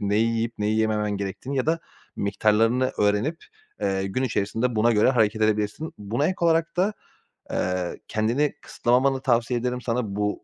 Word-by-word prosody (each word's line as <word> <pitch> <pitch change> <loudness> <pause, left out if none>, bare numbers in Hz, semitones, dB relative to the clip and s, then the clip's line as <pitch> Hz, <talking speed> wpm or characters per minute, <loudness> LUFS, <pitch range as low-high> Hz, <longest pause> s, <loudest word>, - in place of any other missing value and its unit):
neyi 105 +2 +2
yiyip 115 +1 -1
neyi 105 +1 +1
yememen 105 -1 +1
gerektiğini 100 +8 -4
ya 130 - 0
da 165 +1 +2 0.4
miktarlarını 110 +5 +2
öğrenip, 105 +11 +1 0.4
eee, 95 0 0
gün 130 +7 -2
içerisinde 115 +1 -1
buna 115 +2 +4
göre 110 +4 +4
hareket 110 -3 +2
edebilirsin. 105 +8 0
Buna 110 +8 -1
ek 185 - -1
olarak 165 0 +2
da, 195 +4 +2 0.6
eee, 90 -1 -2
kendini 120 +7 +1
kısıtlamamanı 130 +3 +1
tavsiye 120 -1 +1
ederim 125 +1 -2
sana 115 -4 -2
bu 105 0 -2
115 Hz, 155 wpm, -25 LUFS, 105-130 Hz, 0.6 s, buna